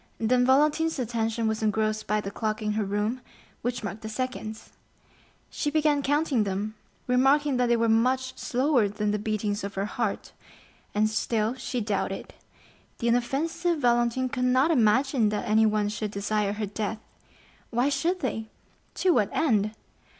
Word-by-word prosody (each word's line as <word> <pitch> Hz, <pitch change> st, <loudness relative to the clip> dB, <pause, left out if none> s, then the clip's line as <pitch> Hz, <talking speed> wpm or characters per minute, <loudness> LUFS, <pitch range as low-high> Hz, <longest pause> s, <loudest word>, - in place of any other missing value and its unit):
Then 245 Hz, +2 st, +2 dB
Valentine's 300 Hz, +4 st, +3 dB
attention 230 Hz, -2 st, -1 dB
was 220 Hz, 0 st, -1 dB
engrossed 215 Hz, 0 st, 0 dB
by 210 Hz, 0 st, +1 dB
the 200 Hz, -, -5 dB
clock 215 Hz, +1 st, -2 dB
in 210 Hz, -, 0 dB
her 215 Hz, 0 st, 0 dB
room, 210 Hz, +5 st, -1 dB, 0.4 s
which 245 Hz, 0 st, -3 dB
marked 205 Hz, +1 st, -5 dB
the 220 Hz, -, -6 dB
seconds. 220 Hz, -2 st, -5 dB, 0.8 s
She 295 Hz, -, -1 dB
began 300 Hz, -1 st, +2 dB
counting 285 Hz, -4 st, +1 dB
them, 200 Hz, +2 st, -3 dB, 0.3 s
remarking 270 Hz, +2 st, +3 dB
that 250 Hz, 0 st, +2 dB
they 235 Hz, 0 st, +3 dB
were 230 Hz, 0 st, +2 dB
much 255 Hz, +3 st, +2 dB
slower 250 Hz, -3 st, +1 dB
than 210 Hz, +1 st, -1 dB
the 210 Hz, -, -1 dB
beatings 210 Hz, -1 st, -2 dB
of 200 Hz, -, -5 dB
her 195 Hz, +1 st, -1 dB
heart; 225 Hz, -2 st, -3 dB, 0.6 s
and 215 Hz, +1 st, +3 dB
still 220 Hz, +1 st, 0 dB
she 255 Hz, -1 st, -4 dB
doubted,—the 205 Hz, +3 st, -6 dB
inoffensive 315 Hz, +9 st, 0 dB
Valentine 240 Hz, -1 st, +2 dB
could 250 Hz, 0 st, -1 dB
not 260 Hz, +5 st, +3 dB
imagine 250 Hz, -2 st, +3 dB
that 210 Hz, +3 st, -3 dB
anyone 215 Hz, -1 st, +3 dB
should 210 Hz, 0 st, -3 dB
desire 205 Hz, 0 st, -1 dB
her 210 Hz, 0 st, -3 dB
death. 210 Hz, +2 st, -3 dB, 0.7 s
Why 245 Hz, +4 st, +1 dB
should 335 Hz, +6 st, 0 dB
they? 220 Hz, -6 st, -2 dB, 0.5 s
To 370 Hz, -, +2 dB
what 215 Hz, -, +2 dB
end? 220 Hz, -8 st, +1 dB
230 Hz, 155 wpm, -27 LUFS, 215-260 Hz, 0.8 s, Valentine's